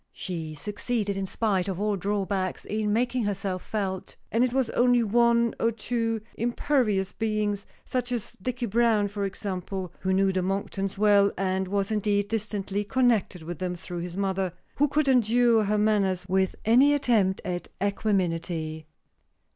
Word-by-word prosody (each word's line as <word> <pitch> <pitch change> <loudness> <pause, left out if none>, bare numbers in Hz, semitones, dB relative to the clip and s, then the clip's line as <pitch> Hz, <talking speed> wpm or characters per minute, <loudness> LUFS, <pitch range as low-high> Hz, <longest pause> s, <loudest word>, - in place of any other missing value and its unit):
She 160 -4 -5
succeeded, 205 +4 -2
in 195 0 -2
spite 195 -3 0
of 190 -2 -3
all 210 0 +1
drawbacks, 195 -1 -2
in 215 0 -1
making 240 +1 +1
herself 195 -2 -2
felt; 195 -3 -4 0.2
and 230 +2 +3
it 255 - +1
was 260 -2 0
only 245 -1 +4
one 235 +1 +3
or 230 - +2
two 225 0 -2 0.2
impervious 230 -5 +1
beings, 210 -2 -1 0.2
such 250 -1 -2
is 240 -4 -2
Dicky 250 +2 -2
Browne 220 -2 +2
for 200 0 -3
example 190 -1 -4
(who 190 - -1
knew 195 +1 +3
the 185 0 0
Monktons 195 +1 -2
well, 205 -1 +5
and 190 0 0
was 200 +1 -1
indeed 205 -1 +1
distantly 205 -2 -2
connected 220 -6 +1
with 165 -1 -6
them 180 -1 -2
through 175 0 -6
his 175 +1 -6
mother), 190 -2 -1 0.2
who 290 - +4
could 295 +1 +1
endure 240 -3 +4
her 210 +1 +1
manners 200 -4 +1
with 190 0 +1
any 260 +6 +6
attempt 220 -9 +2
at 175 -1 -3
equanimity. 170 -6 -1
205 Hz, 155 wpm, -27 LUFS, 190-230 Hz, 0.2 s, any